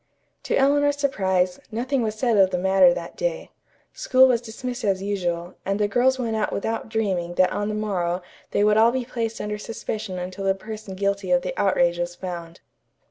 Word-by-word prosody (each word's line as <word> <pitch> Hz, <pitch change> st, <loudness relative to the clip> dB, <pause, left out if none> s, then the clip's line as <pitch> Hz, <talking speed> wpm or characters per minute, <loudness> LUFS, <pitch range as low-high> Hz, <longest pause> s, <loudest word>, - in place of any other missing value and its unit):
To -, -, +1 dB
Eleanor's 285 Hz, +1 st, +3 dB
surprise, 190 Hz, -10 st, 0 dB
nothing 250 Hz, +4 st, -1 dB
was 215 Hz, -2 st, -1 dB
said 235 Hz, 0 st, +1 dB
of 195 Hz, -2 st, +5 dB
the 180 Hz, -, -1 dB
matter 190 Hz, 0 st, +5 dB
that 170 Hz, -1 st, -5 dB
day. -, -, -3 dB, 0.4 s
School 260 Hz, 0 st, +5 dB
was 240 Hz, -3 st, +2 dB
dismissed 245 Hz, +2 st, -6 dB
as 195 Hz, -2 st, 0 dB
usual, 175 Hz, -3 st, -2 dB
and 195 Hz, +1 st, -1 dB
the 210 Hz, -, +2 dB
girls 250 Hz, +5 st, +2 dB
went 230 Hz, -3 st, -2 dB
out 215 Hz, -, 0 dB
without 225 Hz, +2 st, -3 dB
dreaming 190 Hz, -6 st, -1 dB
that 185 Hz, 0 st, +3 dB
on 205 Hz, +1 st, -2 dB
the 215 Hz, -, -2 dB
morrow 185 Hz, -4 st, -1 dB, 0.3 s
they 205 Hz, -, +1 dB
would 210 Hz, 0 st, +4 dB
all 225 Hz, +2 st, +6 dB
be 255 Hz, -1 st, -2 dB
placed 230 Hz, -2 st, -3 dB
under 210 Hz, 0 st, -4 dB
suspicion 215 Hz, -3 st, -5 dB
until 185 Hz, +2 st, -5 dB
the 195 Hz, 0 st, +2 dB
person 215 Hz, -1 st, -8 dB
guilty 200 Hz, 0 st, -1 dB
of 180 Hz, 0 st, +3 dB
the -, -, -3 dB
outrage 175 Hz, -3 st, +2 dB
was 175 Hz, 0 st, -3 dB
found. 175 Hz, -2 st, -7 dB
205 Hz, 195 wpm, -24 LUFS, 185-230 Hz, 0.4 s, all